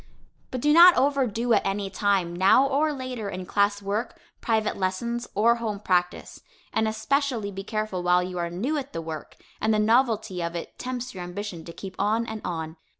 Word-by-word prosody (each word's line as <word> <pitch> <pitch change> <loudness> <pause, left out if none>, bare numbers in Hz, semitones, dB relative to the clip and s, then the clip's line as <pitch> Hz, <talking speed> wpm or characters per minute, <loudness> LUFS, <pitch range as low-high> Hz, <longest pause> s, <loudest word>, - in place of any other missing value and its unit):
But 255 - -4
do 295 +2 +4
not 345 +2 +9
overdo 250 -4 +1
at 205 - +3
any 195 0 -2
time, 190 -4 0
now 195 +9 +5
or 285 +3 +1
later, 255 -6 -5
in 185 -1 -6
class 200 +1 +1
work, 205 +4 -3 0.2
private 220 -2 0
lessons, 235 +6 -2
or 230 +4 +4
home 215 -3 -3
practice, 180 -3 -1 0.3
and 220 0 +1
especially 235 -1 -1
be 195 0 -6
careful 215 -3 -3
while 180 0 +3
you 180 0 -5
are 170 0 -1
new 245 - -1
at 275 0 -8
the 165 - -3
work, 160 -2 -7 0.3
and 220 - +2
the 215 - +3
novelty 220 -4 +2
of 170 0 -3
it 170 - -7
tempts 255 0 -4
your 185 -2 -6
ambition 180 -1 -6
to 170 - -8
keep 190 +2 -9
on 215 +4 +1
and 220 -2 -6
on. 160 -1 -4
210 Hz, 195 wpm, -25 LUFS, 185-240 Hz, 0.3 s, not